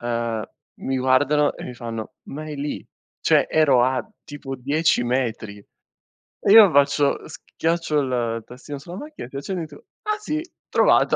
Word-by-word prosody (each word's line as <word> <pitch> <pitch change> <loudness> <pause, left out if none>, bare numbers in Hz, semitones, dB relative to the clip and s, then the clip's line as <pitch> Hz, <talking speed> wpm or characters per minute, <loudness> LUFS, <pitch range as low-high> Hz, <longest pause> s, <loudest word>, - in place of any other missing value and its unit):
uhm, 115 -2 -2 0.4
mi 135 0 -1
guardano 145 +3 +3
e - - -9
mi 125 - -7
fanno: 115 -2 -6
"Ma 150 +3 -6
è 155 -1 -6
lì." 145 +1 -4 0.4
Cioè, - - +4
ero 140 -6 +4
a 130 +1 0 0.2
tipo 140 -2 -7
10 145 +2 +1
metri. 115 -4 -2 0.8
E - - +1
io 215 -2 +10
faccio 145 0 +2
schiaccio 165 0 -2
il 120 -4 -1
tastino 135 +4 -9
sulla 170 +6 -9
macchina, 300 - -8
schiaccio 140 +7 -7
il 180 - -2
dito: 155 -3 -9 0.2
"Ah 425 0 -1
sì, 310 -7 -2 0.3
trovato." - - +4
140 Hz, 155 wpm, -23 LUFS, 125-155 Hz, 0.8 s, io